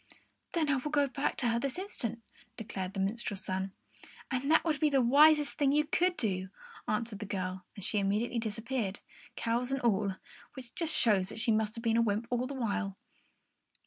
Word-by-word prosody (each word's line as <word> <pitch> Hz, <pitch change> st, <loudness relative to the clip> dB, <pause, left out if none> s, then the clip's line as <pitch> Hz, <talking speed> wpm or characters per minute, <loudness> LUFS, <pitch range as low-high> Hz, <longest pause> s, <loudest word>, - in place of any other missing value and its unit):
"Then 325 Hz, -3 st, +1 dB
I 280 Hz, -1 st, +2 dB
will 260 Hz, +4 st, -3 dB
go 290 Hz, -2 st, +3 dB
back 275 Hz, +1 st, -2 dB
to 240 Hz, -, +2 dB
her 230 Hz, 0 st, +1 dB
this 275 Hz, +1 st, -2 dB
very 370 Hz, -, -2 dB
instant," 235 Hz, -, -4 dB, 0.3 s
declared 195 Hz, -4 st, -5 dB
the -, -, -2 dB
minstrel's 200 Hz, 0 st, -2 dB
son. 190 Hz, +1 st, -2 dB, 0.6 s
"And 265 Hz, +2 st, -1 dB
that 320 Hz, -, +5 dB
would 310 Hz, -4 st, +1 dB
be 305 Hz, -, +3 dB
the 275 Hz, -2 st, +3 dB
wisest 295 Hz, +4 st, +6 dB
thing 280 Hz, -2 st, +4 dB
you 300 Hz, +1 st, +3 dB
could 355 Hz, +4 st, +1 dB
do," 190 Hz, -4 st, -1 dB, 0.4 s
answered 215 Hz, -1 st, -2 dB
the 210 Hz, -, -5 dB
girl; 185 Hz, -2 st, -3 dB
and 200 Hz, -, -3 dB
she 210 Hz, -, +2 dB
immediately 210 Hz, +5 st, 0 dB
disappeared, 225 Hz, -1 st, -3 dB, 0.4 s
cows 240 Hz, +2 st, 0 dB
and 270 Hz, -, 0 dB
all, 205 Hz, -4 st, +1 dB, 0.4 s
which 255 Hz, -3 st, -10 dB
just 325 Hz, -4 st, -1 dB
shows 195 Hz, -5 st, +3 dB
that -, -, -5 dB
she 230 Hz, 0 st, +2 dB
must 215 Hz, 0 st, +1 dB
have 230 Hz, -, -6 dB
been 230 Hz, -1 st, +2 dB
a -, -, +5 dB
wymp 215 Hz, 0 st, 0 dB
all 245 Hz, +1 st, 0 dB
the 280 Hz, -, -6 dB
while. 205 Hz, -5 st, -2 dB
230 Hz, 205 wpm, -31 LUFS, 205-275 Hz, 0.6 s, wisest